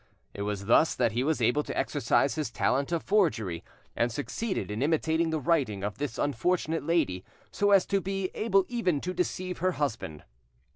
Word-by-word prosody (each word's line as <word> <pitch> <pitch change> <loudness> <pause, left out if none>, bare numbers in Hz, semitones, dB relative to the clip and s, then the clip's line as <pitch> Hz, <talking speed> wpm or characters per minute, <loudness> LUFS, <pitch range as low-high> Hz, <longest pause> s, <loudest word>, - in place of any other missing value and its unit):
It 100 - -6
was 100 -1 -3
thus 135 +9 +4
that 120 -3 +2
he 120 +3 0
was 150 -4 0
able 125 +6 +3
to - - -6
exercise - - +1
his 155 -5 -2
talent 135 +5 0
of 170 -2 -1
forgery, 115 - +1 0.3
and 120 +1 +1
succeeded 150 - -3
in 105 +3 -3
imitating 160 +2 +1
the 160 -1 -1
writing 130 - 0
of 105 +2 -4
this 140 -5 -3
unfortunate 160 +4 0
lady 145 - 0 0.3
so 205 - +1
as 195 -2 +5
to 195 -1 0
be 195 0 -3
able 195 -3 +2
even 205 -11 0
to 180 - -3
deceive 180 0 -2
her 185 +2 +1
husband. 110 - -3
155 Hz, 185 wpm, -28 LUFS, 115-180 Hz, 0.3 s, as